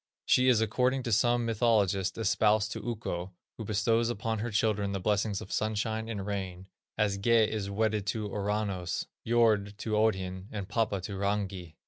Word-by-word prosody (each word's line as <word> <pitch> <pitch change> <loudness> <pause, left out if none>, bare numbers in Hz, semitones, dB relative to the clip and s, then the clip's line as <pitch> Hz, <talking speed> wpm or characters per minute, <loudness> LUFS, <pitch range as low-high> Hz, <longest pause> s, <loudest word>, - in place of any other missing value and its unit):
She 130 0 +4
is 115 -3 +4
according 125 +4 +1
to 120 - -3
some 120 +2 +3
mythologists 105 -5 +1
espoused 110 0 +2
to - - -5
Ukko, 95 -6 -4 0.3
who 110 - -4
bestows 115 +3 +1
upon 110 -1 -2
her 120 +3 -2
children 105 -2 0
the 95 - -2
blessings 105 +1 0
of - - -9
sunshine 110 +1 -1
and 100 -4 -4
rain, 95 -3 -4 0.3
as 100 -2 +1
Gé 115 +1 +4
is 105 -2 -3
wedded 105 0 0
to 105 0 -1
Ouranos, 100 -3 -2 0.2
Jordh 110 -3 +3
to 110 0 -4
Odhin, 95 -3 0
and 100 -3 -5
Papa 105 -2 0
to 95 +1 -5
Rangi. 95 -4 -2
105 Hz, 165 wpm, -30 LUFS, 100-110 Hz, 0.3 s, She